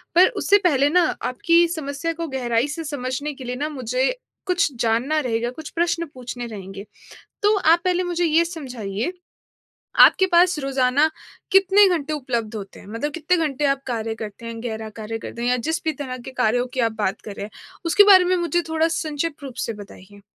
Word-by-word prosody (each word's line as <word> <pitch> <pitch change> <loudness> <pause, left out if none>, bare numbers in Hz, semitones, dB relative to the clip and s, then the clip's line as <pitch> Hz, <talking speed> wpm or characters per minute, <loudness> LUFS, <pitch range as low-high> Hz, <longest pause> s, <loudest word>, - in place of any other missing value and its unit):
पर 365 +2 +8
उससे 405 - +5
पहले 285 -4 +3
ना, 355 +2 +4 0.2
आपकी 335 +7 +3
समस्या 285 +2 -3
को 335 0 -5
गहराई 245 -1 0
से 325 +2 -5
समझने 285 0 -4
के 260 - -10
लिए 250 0 -4
ना, 295 +4 -2
मुझे 255 -2 -1 0.3
कुछ 360 -6 +1
जानना 240 +7 +1
रहेगा, 235 -3 -1
कुछ 315 +4 -9
प्रश्न 340 0 0
पूछने 245 -1 -6
रहेंगे। 195 -1 -8 0.6
तो 415 +1 +4
आप 335 -2 +4
पहले 365 0 +1
मुझे 350 -1 -1
ये 330 +2 +3
समझाइए, 250 - -4 0.9
आपके 380 - +7
पास 350 -1 +5
रोज़ाना 275 +2 +2 0.4
कितने 390 +1 +6
घंटे 310 -4 -1
उपलब्ध 235 -6 -3
होते 195 -2 -9
हैं, - - -15
मतलब 230 +8 -4
कितने 335 +3 +1
घंटे 290 0 -3
आप 275 0 0
कार्य 225 -2 -2
करते 220 +1 -8
हैं, 230 0 -6
गहरा 220 -2 -4
कार्य 225 +1 -4
करते 235 +1 -7
हैं? 245 - 0
या 250 - +3
जिस 330 +2 -1
भी 315 - +1
तरह 260 -4 -6
के 255 +2 -9
कार्यों 245 +1 +1
की 260 - 0
आप - - -10
बात 195 -2 -1
कर 210 - -6
रहे 200 - -6
हैं, - - -15 0.3
उसके 380 +5 +6
बारे 370 -1 +7
में 365 +1 +2
मुझे 345 0 0
थोड़ा 320 +1 +1
संक्षिप्त 315 -1 -3
रूप 265 -3 -7
से - - -1
बताइए। 205 -1 -13
280 Hz, 195 wpm, -22 LUFS, 235-335 Hz, 0.9 s, पर